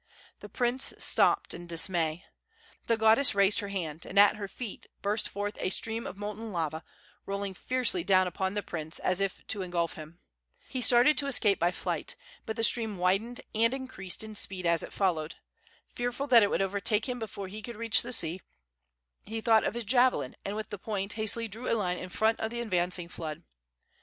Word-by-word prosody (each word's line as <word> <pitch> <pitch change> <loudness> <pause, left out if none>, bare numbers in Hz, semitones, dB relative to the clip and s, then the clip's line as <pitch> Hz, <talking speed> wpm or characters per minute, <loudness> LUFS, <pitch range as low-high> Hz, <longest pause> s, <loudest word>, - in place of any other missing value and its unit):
The - - -11
prince 250 +2 0
stopped - - +3
in 175 - -9
dismay. 165 0 0 0.6
The 230 - +2
goddess 220 +3 +5
raised 200 0 +4
her 205 - -4
hand, 170 -6 -4
and 195 - -6
at 205 +1 +7
her 205 -2 -5
feet 225 +1 -8 0.2
burst 210 +2 0
forth 205 +1 -4
a - - 0
stream 225 +4 -3
of - - -8
molten 210 +2 -6
lava, 160 -3 -3 0.4
rolling 200 0 -3
fiercely 235 -4 +1
down 185 0 +4
upon 190 +2 -2
the 205 - -2
prince, 160 -1 -5
as 185 0 -1
if 195 -1 -2
to 205 - -4
engulf 175 -2 -1
him. 155 +2 -11 0.5
He 255 - -3
started 245 +5 +6
to 280 - -1
escape 210 -8 +3
by 175 - +3
flight, 180 - -3 0.3
but 220 - -3
the 225 - -1
stream 225 -3 +5
widened 195 +7 0
and 230 +3 +2
increased 240 -9 -6
in 215 0 -8
speed 190 -3 -3
as 170 0 +2
it - - -5
followed. 165 -5 -1 0.6
Fearful 245 +3 -2
that 245 -5 +7
it 205 - +3
would - - +1
overtake 200 +3 -1
him 250 -1 -3
before 205 -3 -6
he 210 +3 -8
could 235 +2 -8
reach 230 -1 +5
the 240 - -5
sea, 180 -5 +2 0.8
he 225 +2 -5
thought 220 -1 +4
of - - -2
his 240 - -3
javelin, 245 - +2
and 200 - -4
with 215 +1 -5
the 205 - -5
point 200 -1 -3
hastily 225 +1 -1
drew 225 +4 -6
a 230 - +2
line 180 -4 -1
in 185 - -7
front 220 +4 +1
of 220 - -2
the 235 +1 -5
advancing 180 -5 0
flood. 155 -3 -7
205 Hz, 200 wpm, -29 LUFS, 180-230 Hz, 0.8 s, at